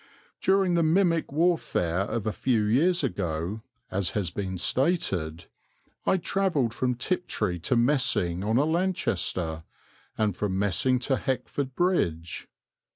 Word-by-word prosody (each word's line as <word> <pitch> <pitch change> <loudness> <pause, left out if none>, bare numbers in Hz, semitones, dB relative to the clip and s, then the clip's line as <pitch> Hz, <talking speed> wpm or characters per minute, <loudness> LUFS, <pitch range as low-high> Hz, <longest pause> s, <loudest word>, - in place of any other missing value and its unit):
During 190 -1 +3
the 170 - +3
mimic 165 0 +2
warfare 150 - +1
of 100 +2 -2
a 110 - -1
few 120 -5 +1
years 155 +12 +2
ago, 90 +4 -2 0.3
as 95 -2 +1
has 95 -5 -1
been 95 0 -4
stated, 90 - 0 0.6
I 190 - +4
travelled 170 - 0
from 125 -1 0
Tiptree 115 - -2
to 90 +9 0
Messing 115 -9 +2
on 110 +3 +1
a 140 - +3
Lanchester, 105 - -1 0.5
and 105 -4 +1
from 95 -2 -1
Messing 100 +6 +2
to 135 +1 +1
Heckford 135 0 -3
Bridge. 85 - 0
120 Hz, 130 wpm, -27 LUFS, -, 0.6 s, I